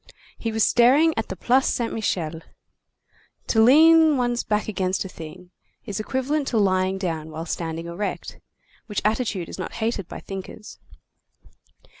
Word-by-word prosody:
He 225 - -4
was 220 0 +1
staring 275 +7 +4
at 225 - -3
the 190 - -4
Place 255 +8 +2
Saint 235 -2 -1
Michel. 165 -7 -2 1.0
To 220 - +2
lean 315 +4 +6
one's 240 -1 0
back 210 -1 -1
against 190 -2 -1
a - - -4
thing 180 +1 -11 0.3
is 205 -2 -4
equivalent 265 +5 -1
to 235 - 0
lying 190 -2 +2
down 165 -5 -3
while 160 +1 -6
standing 165 0 -4
erect, 170 +5 -5 0.5
which 210 -3 -3
attitude 215 -5 0
is - - -9
not 185 - -5
hated 220 -5 -2
by - - -8
thinkers. 195 +2 -9
210 Hz, 150 wpm, -23 LUFS, 185-245 Hz, 1.0 s, lean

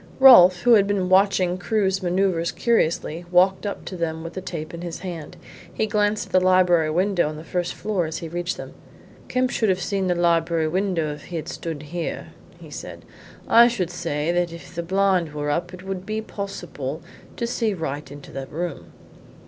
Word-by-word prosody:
Rolfe, 185 -9 +8
who 240 -1 +6
had 200 -3 +5
been 195 -3 0
watching 185 -1 +3
Crewe's 190 0 0
manoeuvres 180 -2 +1
curiously, 170 -7 0
walked 185 +3 +3
up 200 - -5
to 185 - -6
them 160 -2 -3
with 165 0 -7
the 190 - -5
tape 160 -4 -6
in 170 - -7
his 170 -2 -6
hand. 170 -5 -7 0.3
He 220 - -1
glanced 210 0 0
at - - -18
the 185 - +5
library 180 -3 +4
window 180 0 +1
on 155 - -6
the 155 - -8
first 175 +1 -3
floor 195 -5 -1
as 160 +1 -4
he 165 - -6
reached 175 +2 -3
them. - - -8 0.5
"Kemp 255 0 0
could 220 - +1
have 185 -1 +2
seen 190 +1 -1
the 180 - +1
library 170 -1 +2
window 175 -3 -1
if 150 - -12
he 175 - -8
had 160 0 -4
stood 165 -3 -5
here," 165 +3 -5 0.3
he - - -13
said. - - -8 0.4
"I 235 +1 +7
should 190 -8 -2
say 165 -2 -2
that 175 -1 0
if 170 +1 -11
the 170 - -3
blind 185 -2 +1
were 145 0 -1
up 175 +4 -2
it 185 0 -10
would 190 -1 -5
be 215 +2 -3
possible 175 -9 -6 0.3
to 235 - -1
see 230 -3 -1
right 145 -4 -5
into 145 0 -11
the 135 0 -6
room." 175 +3 -5
180 Hz, 200 wpm, -23 LUFS, 165-195 Hz, 0.5 s, Rolfe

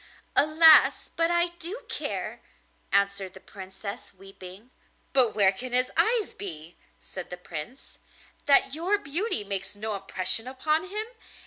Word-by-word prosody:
'Alas! 310 +1 +6
but 330 0 +1
I 345 0 +1
do 370 +9 -8
care,' - - -5 0.5
answered 200 -1 0
the - - -11
Princess, 195 +1 -10
weeping. 195 +4 -13 0.4
'But 255 -4 +3
where 195 -2 +4
can 245 +6 -7
his 250 +1 +1
eyes 455 -3 +1
be,' 165 -3 -8 0.2
said 185 -2 -9
the 180 - -7
Prince, 175 - -9 0.5
'that 275 -1 +4
your 355 +7 0
beauty 350 - -2
makes 195 0 -3
no 215 +1 -4
impression 195 +3 +2
upon 305 +7 -2
him? 425 +2 -3
225 Hz, 135 wpm, -26 LUFS, 195-320 Hz, 0.5 s, Alas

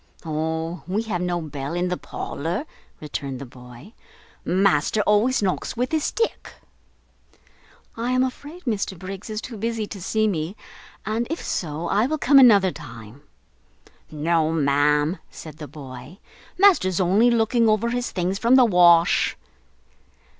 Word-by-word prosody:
"O, 160 +2 -3
we 200 +5 -1
have 205 -6 -3
no 175 -1 -1
bell 145 0 -5
in 180 +1 -1
the 180 - -1
parlour," 175 - -5 0.3
returned 140 -3 -5
the 140 - -8
boy, 125 - -14 0.5
"master 190 +1 +2
always 210 +4 +2
knocks 190 +4 -2
with 250 +1 -1
his 315 -2 0
stick." 460 0 -2 1.4
"I 235 +2 -3
am 255 0 +2
afraid 290 +7 -6
Mr 205 -6 -2
Briggs 195 +3 -8
is 215 0 -4
too 235 -2 -8
busy 225 0 -2
to 200 -2 -9
see 215 +4 0
me, 170 -1 -2 0.5
and 225 +2 -1
if 325 - -4
so, 160 0 -3
I 210 +7 +2
will 310 +2 -1
come 280 -1 +5
another 205 -7 +6
time." 120 -4 -11 0.9
"No, 160 +1 0
ma'am," 150 +2 +2
said 155 -2 -11
the 150 -2 -8
boy, 135 +2 -11 0.4
"master's 345 - +4
only 195 +6 +4
looking 230 0 +2
over 215 +2 +1
his 245 0 -2
things 185 +2 -2
from 235 +2 +4
the 255 -2 +7
wash." 175 -4 +4
185 Hz, 145 wpm, -23 LUFS, 155-230 Hz, 1.4 s, the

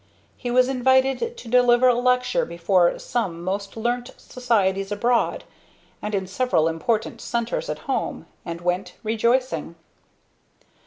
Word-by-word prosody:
He 245 - -5
was 250 +1 +4
invited 265 - +2
to - - -10
deliver 245 +1 +5
a 250 - +6
lecture 250 +1 +1
before 170 +1 +2
some 185 -9 -3
most 195 +3 -4
learned 240 +2 -1
societies 200 -6 0
abroad, 235 +3 +1 0.6
and 210 0 -3
in 190 -1 -1
several 190 -5 +1
important 210 +7 -1
centers 240 - -2
at - - -2
home, - - -2 0.2
and 170 0 -6
went, 180 +2 -2
rejoicing. 230 - 0
235 Hz, 125 wpm, -23 LUFS, 190-250 Hz, 0.6 s, a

